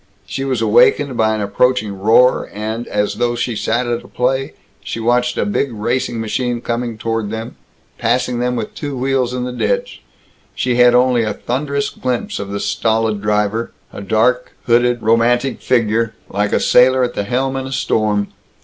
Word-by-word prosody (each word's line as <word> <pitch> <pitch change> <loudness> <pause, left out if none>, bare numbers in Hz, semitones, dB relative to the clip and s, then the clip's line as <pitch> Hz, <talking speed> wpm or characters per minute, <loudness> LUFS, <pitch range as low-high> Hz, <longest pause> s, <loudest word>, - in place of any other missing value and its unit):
She 115 +8 -4
was 130 -4 -1
awakened 130 +5 +4
by 110 -1 +2
an 110 - -3
approaching 105 +1 +1
roar 115 +5 +4
and, 110 +3 -4
as 105 0 -1
though 120 0 0
she 120 0 -2
sat 120 +3 0
at 120 0 -2
a - - -14
play, 130 +2 -1 0.3
she - - -5
watched 125 +2 +1
a - - +1
big 140 -10 -1
racing 120 +2 -2
machine 120 +2 -2
coming 120 -1 -3
toward 115 -1 -2
them, 110 +2 -6 0.4
passing 125 -1 0
them 125 0 0
with 110 -3 -4
two 145 -3 -5
wheels 130 -1 0
in 125 0 -3
the 125 - -3
ditch. - - -2 0.5
She 125 -1 0
had 125 0 +6
only 125 -1 +3
a 105 -2 -2
thunderous 140 +4 -2
glimpse 125 -2 -3
of 100 0 -5
the 100 0 -3
stolid 110 +1 0
driver; 105 +2 0 0.2
a - - -7
dark, 120 +5 +1
hooded, 120 0 +2
romantic 120 +3 +2
figure, 115 -2 +1
like 100 +1 -1
a - - +2
sailor 130 +1 +4
at 120 - -1
the 100 - -2
helm 130 +3 -1
in 135 0 -3
a - - -7
storm. 105 -5 0
120 Hz, 180 wpm, -17 LUFS, 110-125 Hz, 0.5 s, had